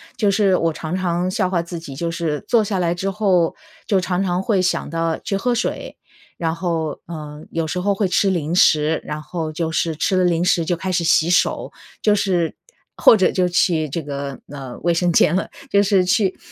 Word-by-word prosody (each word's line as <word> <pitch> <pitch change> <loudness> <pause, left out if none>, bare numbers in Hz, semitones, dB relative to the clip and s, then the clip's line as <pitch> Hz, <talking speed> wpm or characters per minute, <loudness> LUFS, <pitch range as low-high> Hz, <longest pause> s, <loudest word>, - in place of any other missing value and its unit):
就 210 - +1
是 195 -2 +3
我 165 -1 0
常 160 +2 -4
常 180 -1 -1
笑 190 -3 0
话 175 -3 0
自 170 0 -7
己， 145 -5 -9
就 165 +4 -2
是， 160 -4 -3
坐 230 -2 +3
下 200 -2 -2
来 175 -1 +1
之 190 +3 -2
后 190 -4 +1 0.3
就 195 -3 +3
常 180 0 -1
常 180 -1 0
会 195 -4 +1
想 180 - -1
到 165 0 -1
去 195 - -3
喝 240 +4 0
水， 240 - -3 0.4
然 165 -1 -1
后， 165 -3 -2
呃， 150 -2 -8
有 165 -1 -1
时 180 +3 -3
候 200 +2 +1
会 195 0 +1
吃 195 +2 +2
零 170 -3 -1
食。 155 -3 +3
然 150 0 -5
后 160 -1 -4
就 160 +1 -3
是 160 0 -1
吃 185 +5 0
了 185 - +3
零 175 -1 +2
食 170 -2 +2
就 175 - 0
开 185 +3 -4
始 175 -1 0
洗 165 0 +3
手， 180 - +1 0.3
就 210 - +3
是 180 -5 0 0.4
或 225 - +6
者 190 - +3
就 185 -1 +1
去 170 -3 +1
这 165 +4 -4
个， 140 -1 -5
呃， 135 -4 -8
卫 175 -1 +2
生 175 +1 +1
间 165 +1 +4
了。 190 - -1 0.2
就 200 - +5
是 195 -2 +3
去 190 0 +1
175 Hz, 235 characters per minute, -20 LUFS, 160-190 Hz, 0.4 s, 或